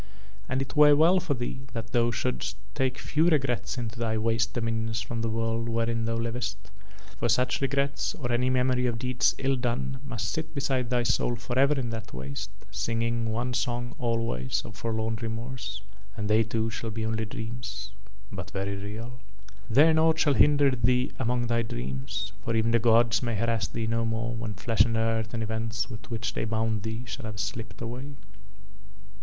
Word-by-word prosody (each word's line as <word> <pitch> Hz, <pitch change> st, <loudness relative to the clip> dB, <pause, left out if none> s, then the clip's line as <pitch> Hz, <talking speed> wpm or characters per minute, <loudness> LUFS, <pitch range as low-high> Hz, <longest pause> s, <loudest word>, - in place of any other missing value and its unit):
And 130 Hz, +1 st, +1 dB
it 135 Hz, -, -10 dB
were 150 Hz, -1 st, +8 dB
well 170 Hz, +5 st, +6 dB
for 175 Hz, -6 st, -1 dB
thee 130 Hz, +2 st, -5 dB
that 115 Hz, -1 st, -5 dB
thou 120 Hz, -1 st, +3 dB
shouldst 110 Hz, -5 st, -2 dB, 0.2 s
take 130 Hz, +1 st, 0 dB
few 160 Hz, +4 st, +2 dB
regrets 135 Hz, -7 st, +1 dB
into 115 Hz, -1 st, -4 dB
thy 110 Hz, -1 st, 0 dB
waste 115 Hz, 0 st, +1 dB
dominions 115 Hz, -1 st, -1 dB
from 115 Hz, +1 st, -3 dB
the 115 Hz, -, 0 dB
world 115 Hz, +1 st, -1 dB
wherein 115 Hz, 0 st, 0 dB
thou 115 Hz, 0 st, 0 dB
livest, 115 Hz, -2 st, -2 dB, 0.6 s
for 120 Hz, -, +1 dB
such 125 Hz, +4 st, +2 dB
regrets 140 Hz, 0 st, 0 dB
or 120 Hz, -5 st, -3 dB
any 125 Hz, +2 st, +2 dB
memory 125 Hz, -1 st, +2 dB
of 120 Hz, -2 st, -1 dB
deeds 125 Hz, +1 st, +2 dB
ill 135 Hz, 0 st, +1 dB
done 130 Hz, +1 st, -2 dB
must 115 Hz, -6 st, -3 dB
sit 160 Hz, 0 st, -4 dB
beside 135 Hz, -4 st, 0 dB
thy 125 Hz, -1 st, +2 dB
soul 120 Hz, +1 st, +1 dB
forever 130 Hz, +5 st, +2 dB
in 120 Hz, -3 st, -2 dB
that 110 Hz, -, -6 dB
waste, 70 Hz, +9 st, -5 dB, 0.2 s
singing 115 Hz, +3 st, 0 dB
one 120 Hz, +3 st, -1 dB
song 120 Hz, 0 st, -1 dB
always 115 Hz, -, 0 dB
of 105 Hz, -, -9 dB
forlorn 110 Hz, 0 st, -1 dB
remorse; 110 Hz, -3 st, -4 dB, 0.3 s
and 105 Hz, -1 st, -2 dB
they 110 Hz, +1 st, +5 dB
too 110 Hz, 0 st, 0 dB
shall 110 Hz, +1 st, -4 dB
be 110 Hz, +1 st, -3 dB
only 110 Hz, 0 st, 0 dB
dreams 110 Hz, -2 st, -6 dB, 0.4 s
but 95 Hz, -1 st, -6 dB
very 100 Hz, 0 st, -2 dB
real. 110 Hz, +5 st, -6 dB, 0.5 s
"There 145 Hz, +8 st, +6 dB
nought 160 Hz, 0 st, +4 dB
shall 150 Hz, -3 st, +4 dB
hinder 145 Hz, +2 st, +5 dB
thee 125 Hz, 0 st, +2 dB
among 120 Hz, -1 st, +1 dB
thy 115 Hz, 0 st, +2 dB
dreams, 65 Hz, -, -3 dB
for 115 Hz, +1 st, -1 dB
even 115 Hz, 0 st, +2 dB
the 115 Hz, -, +4 dB
gods 115 Hz, -1 st, +4 dB
may 120 Hz, -2 st, -1 dB
harass 115 Hz, -2 st, +1 dB
thee 115 Hz, -, -3 dB
no 115 Hz, +1 st, +1 dB
more 115 Hz, +1 st, -1 dB
when 110 Hz, -2 st, -4 dB
flesh 105 Hz, +3 st, 0 dB
and 115 Hz, -1 st, 0 dB
earth 115 Hz, 0 st, 0 dB
and 115 Hz, -, -1 dB
events 110 Hz, 0 st, -2 dB
with 105 Hz, -2 st, -9 dB
which 110 Hz, -3 st, -2 dB
They -, -, -2 dB
bound 110 Hz, -1 st, 0 dB
thee 110 Hz, +2 st, -4 dB
shall 125 Hz, +1 st, -6 dB
have 105 Hz, -2 st, -6 dB
slipped 115 Hz, +2 st, -4 dB
away." 125 Hz, +5 st, -5 dB
115 Hz, 185 wpm, -28 LUFS, 110-125 Hz, 0.6 s, were